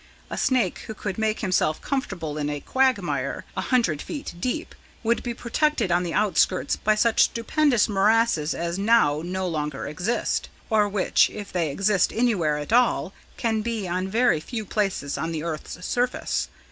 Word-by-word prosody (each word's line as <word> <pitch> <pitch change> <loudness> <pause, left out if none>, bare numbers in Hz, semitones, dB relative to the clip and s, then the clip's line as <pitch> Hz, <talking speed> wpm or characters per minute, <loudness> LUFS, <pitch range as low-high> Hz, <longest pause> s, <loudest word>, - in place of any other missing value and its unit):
A - - -2
snake 255 -3 +1
who 220 - -6
could 200 -1 -4
make 220 0 0
himself 185 -6 +1
comfortable 185 - -3
in 145 0 -1
a 145 0 -3
quagmire, 260 - 0
a - - -1
hundred 230 - +1
feet 290 -3 -6
deep, 305 - -3 0.3
would 235 +1 +1
be 240 -1 -4
protected 240 - 0
on 175 +1 +3
the 175 -2 -3
outskirts 195 -1 +2
by 215 0 +1
such 225 +1 +4
stupendous 245 +1 +2
morasses 205 -5 +2
as 170 +2 -3
now 200 -9 +3
no 185 +1 -2
longer 150 -4 -3
exist, 185 +10 -1 0.2
or 210 -2 +3
which, 200 -2 +3
if 205 -2 -8
they 170 -4 0
exist 195 +5 +2
anywhere 200 -11 +1
at 150 +8 -4
all, 240 -5 +3 0.2
can 225 -2 0
be 220 -3 -3
on 185 +2 -1
very 230 -3 +2
few 220 +7 -5
places 195 -9 -1
on 165 - -2
the 160 -1 -3
earth's 165 +2 -5
surface. 245 +1 -1
205 Hz, 170 wpm, -24 LUFS, 170-235 Hz, 0.3 s, such